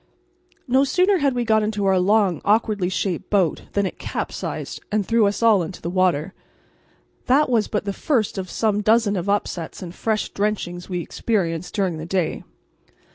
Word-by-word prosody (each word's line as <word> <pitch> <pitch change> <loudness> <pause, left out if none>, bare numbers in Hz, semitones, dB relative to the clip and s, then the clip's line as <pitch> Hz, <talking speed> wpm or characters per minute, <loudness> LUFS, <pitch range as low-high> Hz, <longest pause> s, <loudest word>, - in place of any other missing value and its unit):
No 260 +2 +4
sooner 365 +7 +2
had 280 -3 +1
we 240 -1 0
got 220 -1 +3
into 210 -1 -1
our 190 -1 +3
long, 195 -3 +2
awkwardly 205 -3 +2
shaped 185 -2 -2
boat 190 -6 +1
than 200 -1 +1
it 185 - -5
capsized - - -4
and 210 -1 +1
threw 230 -1 +3
us 205 +3 -2
all 220 -4 +5
into 170 +2 -6
the 170 - -4
water; 185 -2 +1 0.9
that 280 +3 +4
was 225 -3 +2
but 210 -1 -2
the 200 - -2
first 225 -5 0
of 185 -1 -5
some 210 0 0
dozens 215 -1 +3
of 180 +3 -3
upsets 185 -4 -2
and 175 -1 -7
fresh 215 +1 -1
drenchings 200 -4 -3
we 180 -2 -2
experienced 170 -4 -2
during 185 -6 0
the 160 - -6
day. 180 -3 -1
200 Hz, 180 wpm, -22 LUFS, 180-220 Hz, 0.9 s, all